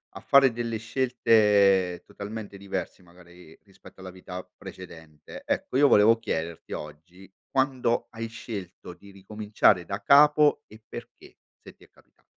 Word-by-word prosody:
a - - -7
fare 135 -2 +4
delle 115 -1 -4
scelte 105 -6 +2
totalmente 105 0 -9
diversi 100 -1 -6
magari 85 -1 -18
rispetto 95 -1 -18
alla 95 0 -9
vita 90 0 -9
precedente. 80 -5 -12
Ecco, 130 - -2
io 145 0 +5
volevo 110 +1 +5
chiederti 85 -7 -5
oggi 85 +6 -11 0.2
quando 130 -3 0
hai 115 0 -6
scelto 100 -6 -9
di 100 +1 -17
ricominciare 105 -2 0
da 100 +4 -5
capo 150 +4 +5
e 110 +1 -17
perché, - - -12 0.2
se - - -15
ti - - -22
è - - -21
capita - - -29
100 Hz, 140 wpm, -26 LUFS, 90-115 Hz, 0.2 s, io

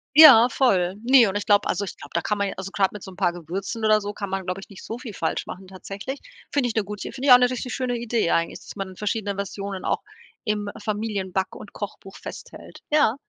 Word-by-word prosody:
Ja, 275 -7 +10
voll. 190 -9 +2
Ne, 255 0 +7
und 195 - -3
ich 205 - -5
glaube 205 -1 +4
also, 200 - 0
ich 185 - -8
glaube, 145 - -12
da 170 - +1
kann 210 - -1
man 200 -1 0
ja, - - -5
also, 190 0 -5
grad 195 -2 +2
mit 210 - -9
so - - -9
'n 185 - -12
paar 175 - +2
Gewürzen 190 +7 -5
oder 215 0 +5
so, 205 0 -5
kann 200 -1 -5
man, 190 -1 -3
glaube 180 +1 -3
ich - - -13
nicht 200 - -12
so 230 - -5
viel 230 -4 -8
falsch 165 -3 -2
machen 190 +1 -8
tatsächlich. 195 +8 -7 0.3
Finde 270 -4 +1
ich 225 - -5
'ne 220 - +2
gute 205 +1 -6
finde 270 +2 -4
ich - - +7
auch - - +11
'ne 250 0 +4
richtig 250 0 -4
schöne 250 -2 -1
Idee 230 -5 0
eigentlich, 165 0 0
dass - - -11
man 195 -2 -5
verschiedene 210 0 -2
Versionen 200 -1 -5
auch - - 0 0.4
im 210 -2 -1
Familienback 205 -3 -2
und 205 - -11
Kochbuch 195 -2 -7
festhält. - - -10
Ja. 295 -7 +4
205 Hz, 250 wpm, -24 LUFS, 190-230 Hz, 0.4 s, auch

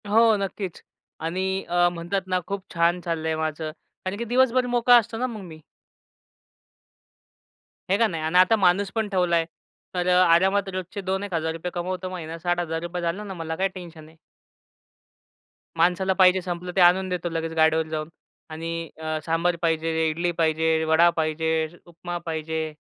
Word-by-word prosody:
हो, 225 +1 +5
नक्कीच 195 -2 -5 0.4
आणि 190 +3 -1
अ, 175 0 +4
म्हणतात 175 +3 -2
ना 185 0 +1
खूप 200 -1 -4
छान 170 +1 +2
चाललंय 160 -2 -2
माझं 155 0 -3 0.3
कारण 190 +2 -3
की 235 - -3
दिवसभर 255 +1 +3
मोकळा 245 0 +5
असतो 225 -1 -1
ना 255 +2 0
मग 225 -4 -7
मी. 160 -4 -11 2.3
आहे 195 - +3
का 230 - +4
नाही 165 -5 -4
आणि 160 +3 +1
आता 185 +5 +6
माणूस 195 0 +2
पण 220 -2 0
ठेवलाय. 175 -4 +2 0.5
तर 180 0 0
अ, 180 0 +5
आरामात 190 +3 +3
रोजचे 185 +2 -5
दोन 190 +1 0
एक 200 -2 -6
हजार 160 -1 0
रुपये 165 +2 -5
कमवतो 185 +1 -3
महिन्यात 165 -3 -6
₹60,000 175 0 -2
झाला 170 +4 -2
ना, 200 -2 -6
मला 165 -2 -4
काय 190 +3 +1
टेन्शन 175 -4 -11
आहे. 160 +1 -19 1.6
माणसाला 180 +3 +2
पाहिजे 185 0 +5
संपलं 180 0 -5
ते 190 - +3
आणून 185 +2 +5
देतो 180 -1 -2
लगेच 165 0 -3
गाडीवर 160 0 +3
जाऊन 155 0 -4 0.4
आणि 165 +1 -5
अ, 155 0 -3
सांभर 170 +1 +1
पाहिजे, 160 -1 +1
इडली 170 +3 -1
पाहिजे, 160 -1 +1
वडा 160 +2 +5
पाहिजे, 160 0 0 0.2
उपमा 175 +1 -6
पाहिजे 160 -1 -3
175 Hz, 165 wpm, -24 LUFS, 160-190 Hz, 2.3 s, आता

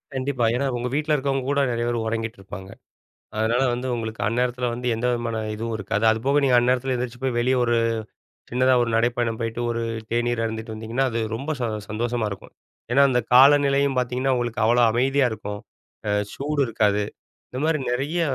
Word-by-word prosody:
கண்டிப்பா. 130 -2 0
ஏன்னா 135 +3 0
உங்க 120 +1 -2
வீட்ல 150 +1 +1
இருக்கிறவங்க 135 -2 -1
கூட 140 0 +1
நிறைய 120 0 -1
பேர் 120 -1 -1
உறங்கிட்ருப்பாங்க. 110 -4 -5 0.7
அதனால 115 +4 +1
வந்து 125 +2 -4
உங்களுக்கு 110 -1 -5
அந்நேரத்துல 125 +2 0
வந்து 125 +1 -6
எந்தவிதமான 120 0 -1 0.2
இதுவும் 115 +1 -3
இருக்காது. 100 +1 -1
அதுபோக 135 +6 +2
நீங்க 130 -2 +4
அந்நேரத்ல 125 +2 +1
எந்திரிச்சி 120 0 -4
போய் 130 -2 0
வெளிய 130 +2 +2
ஒரு 120 0 +2 0.8
சின்னதா 130 +1 +3
ஒரு 120 - -2
நடைப்பயணம் 120 -1 0
போயிட்டு. 115 +1 -3
ஒரு 115 0 -2 0.3
தேநீர் 120 0 0
அருந்திட்டு 110 0 -5
வந்திங்கன்னா, 115 +4 -1
அது 115 - -1 0.2
ரொம்ப 140 +7 -4
ச - - -2 0.3
சந்தோஷமா 115 +1 -1
இருக்கும். 100 - -9 0.4
ஏன்னா 140 +3 +5
அந்த 125 -1 +2
காலநிலையும் 140 0 +5
பாத்தீங்கன்னா 125 +2 0
உங்களுக்கு 120 -2 -1
அவ்வளோ 120 +2 +4
அமைதியா 135 +3 +2
இருக்கும். 105 -1 -5 0.5
அ - - +2 0.2
சூடு 145 +1 -1
இருக்காது. 105 -2 +1 0.5
இந்த 130 - -4
மாரி 160 -1 +1
நெறைய 140 +7 -1
120 Hz, 165 wpm, -23 LUFS, 115-130 Hz, 0.8 s, ஏன்னா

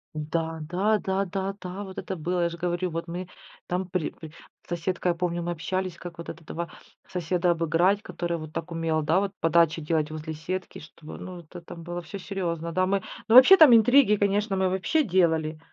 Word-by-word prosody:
Да, 160 +1 -3
да, 190 +7 +1
да, 195 -1 -1
да, 195 +1 -3
да 185 +2 -6
вот 190 -2 -10
это 190 - -5
было. 175 +2 -2
Я 170 - +1
ж 170 - -7
говорю, 175 +1 -1
вот 165 +1 -4
мы 175 +2 -5 0.4
там 180 +1 -2
при 180 -3 -2
при 160 -2 -11 0.4
с - - -24
соседкой, 175 +1 -1
я - - -3
помню, 175 0 -2
мы 175 - -2
общались, 180 +1 -3
как 175 -1 -9
вот 170 - -8
этого 165 +1 -6 0.4
соседа 180 0 0
обыграть, 170 +4 +2
который, 170 -3 -3
вот, 155 -1 -8
так 165 +1 -5
умел, 165 -1 0
да, 160 +5 +3
вот 200 0 -2
подачи 165 -1 +3
делать 155 0 0
возле 155 0 -5
сетки, 180 +4 -5
чтобы 155 0 -11
ну, 185 -1 -8
это 170 +2 -12
там 170 0 -10
было 175 +1 -5
всё 175 +4 -8
серьезно. 170 -4 -3
Да, 185 +2 +1
мы 195 +1 +1 0.3
ну, 225 - +4
вообще, 260 +9 +10
там 295 -9 +9
интриги, 230 0 +5
конечно, 205 0 +1
мы 190 -1 +1
вообще 190 - +1
делали. 160 - +1
175 Hz, 205 wpm, -26 LUFS, 165-190 Hz, 0.4 s, вообще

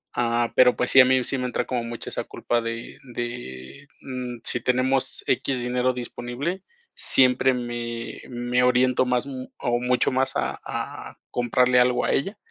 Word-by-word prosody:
ah, 120 -1 0
pero 125 -1 +6
pues 125 - 0
sí, 130 - +9
a - - +6
mí 130 0 +3
sí 135 - 0
me 125 - -2
entra 125 - -2
como 125 -2 -2
mucho 115 0 -6
esa - - -4
culpa 120 0 -2
de 115 0 -6 0.2
de, 120 - -7
mm, 125 -2 -6
si 120 - 0
tenemos 130 +2 +1
equis 130 0 0
dinero 125 +1 0
disponible, 125 +8 -5 0.3
siempre 130 0 +5
me 120 -1 -5
me 120 0 0
oriento 125 0 +3
más 125 0 0
m 130 -2 -7
o 120 0 -1
mucho 125 +1 +1
más 130 +1 0
a - - -2
a - - -6
comprarle 125 +1 +2
algo 125 0 +2
a - - +1
ella, 195 +9 -1
125 Hz, 175 wpm, -24 LUFS, 120-130 Hz, 0.3 s, sí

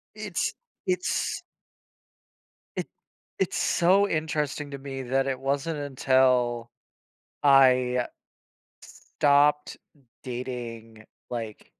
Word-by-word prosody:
It's 210 -4 -2 0.3
it's 180 -1 -1 1.3
It - - -3 0.5
It's - - 0
so 190 +3 +3
interesting 150 -2 -2
to 140 - -5
me 135 -1 -6
that 135 +2 0
it 130 -1 -1
wasn't 140 +3 -1
until 130 -3 +2 0.8
I 130 -2 +5 0.8
stopped 145 +1 +1 0.5
dating, 120 -3 -6 0.3
like 115 -3 -6
135 Hz, 80 wpm, -26 LUFS, 125-150 Hz, 1.3 s, I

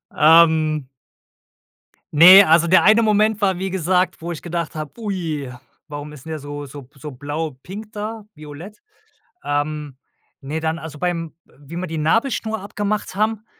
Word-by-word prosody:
Ähm 155 -2 +4 1.3
ne, 185 +5 +10
also, 165 +1 +4
der 185 - +5
eine 220 +3 +5
Moment 215 0 +2
war, 190 -3 +1
wie 190 0 -3
gesagt, 180 -1 0
wo 170 +1 -5
ich 160 - -7
gedacht 170 -2 -4
habe: 155 -2 -5
„Ui, 165 - -4 0.4
warum 145 0 -8
ist 135 - -13
denn 160 - -9
der 155 - -4
so 145 0 -7
so 140 +1 -10
b 135 +4 -25
so 150 - -7
blau 145 +2 -5
pink 210 +3 -9
da, 215 +1 -6
violett?“ 155 - -11 0.6
Ähm, 145 -1 -3 0.4
ne, 150 +4 -4
dann, 160 +1 -2
also, 155 -2 -9
bei 180 - 0
wie 165 -2 -10
wir 185 0 -4
die 160 - -5
Nabelschnur 220 - 0
abgemacht 205 -1 -3
haben, 215 +1 -1
165 Hz, 165 wpm, -20 LUFS, 150-195 Hz, 1.3 s, ne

